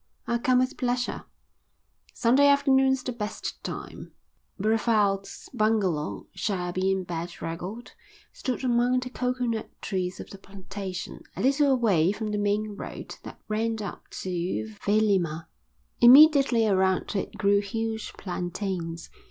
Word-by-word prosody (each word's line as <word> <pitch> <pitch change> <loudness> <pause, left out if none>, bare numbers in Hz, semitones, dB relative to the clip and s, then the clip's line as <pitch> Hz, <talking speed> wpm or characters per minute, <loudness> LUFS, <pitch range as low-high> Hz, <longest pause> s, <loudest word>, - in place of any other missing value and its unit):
"I'll 235 0 0
come 255 +1 +3
with 255 +2 +1
pleasure." 245 -1 -1 0.9
"Sunday 260 +4 +4
afternoon's 270 -2 +4
the 255 - -3
best 215 -3 -5
time." - - -7 0.5
Brevald's 210 -2 +1
bungalow, 200 -8 0
shabby 185 -1 -1
and 190 -1 -1
bedraggled, 175 +5 -6 0.4
stood 255 0 -3
among 245 0 +2
the 250 0 -6
coconut 250 -3 -2
trees 185 -2 -3
of - - -9
the 195 - -10
plantation, 195 -1 -7
a - - -4
little 275 +2 +3
away 200 -10 +3
from 215 +1 -4
the 210 - -1
main 205 +1 0
road - - -8
that - - -10
ran 225 +1 -1
up 200 - -7 0.2
to 170 - -3
Vailima. 195 -7 +1 0.5
Immediately 270 -2 +7
around 190 -1 +1
it 195 - -3
grew 200 0 +3
huge 220 +2 -4
plantains. 175 -2 -4
210 Hz, 125 wpm, -26 LUFS, 190-245 Hz, 0.9 s, Immediately